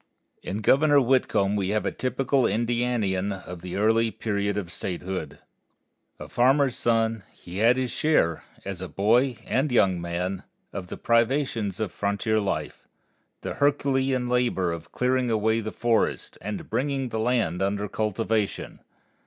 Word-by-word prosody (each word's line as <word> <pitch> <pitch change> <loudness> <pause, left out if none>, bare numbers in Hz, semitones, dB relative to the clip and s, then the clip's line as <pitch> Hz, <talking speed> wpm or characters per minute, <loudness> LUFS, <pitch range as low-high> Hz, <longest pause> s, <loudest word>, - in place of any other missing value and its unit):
In 100 +4 -4
Governor 145 +6 +5
Whitcomb 120 -6 +2
we 95 -2 0
have 105 +1 0
a - - 0
typical 135 +1 +1
Indianian 115 -4 0
of 90 -2 -7
the 90 0 -6
early 115 +2 +3
period 100 -2 -2
of 90 -5 -4
statehood. 90 +1 -4 0.8
A - - -7
farmer's 130 +1 +3
son, 115 -2 +1
he 90 +2 -9
had 115 +3 +5
his 130 -2 -1
share, 85 - +1 0.2
as 95 -2 -5
a 95 - -4
boy 120 +5 +2
and 135 +2 0
young 95 -7 +3
man, 90 +2 -3 0.3
of 95 -3 -5
the - - -7
privations 115 -4 +1
of 110 -4 -2
frontier 105 +2 0
life, 100 -2 -3 0.5
the - - -4
Herculean 135 -3 +1
labor 120 -8 +1
of 85 -1 -7
clearing 125 0 +1
away 110 0 +2
the 110 -1 -4
forests, 115 -2 0
and 105 +2 -5
bringing 135 +2 -1
the 110 - -3
land 110 -7 0
under 100 +1 0
cultivation. 110 0 -2
110 Hz, 145 wpm, -26 LUFS, 100-125 Hz, 0.8 s, Governor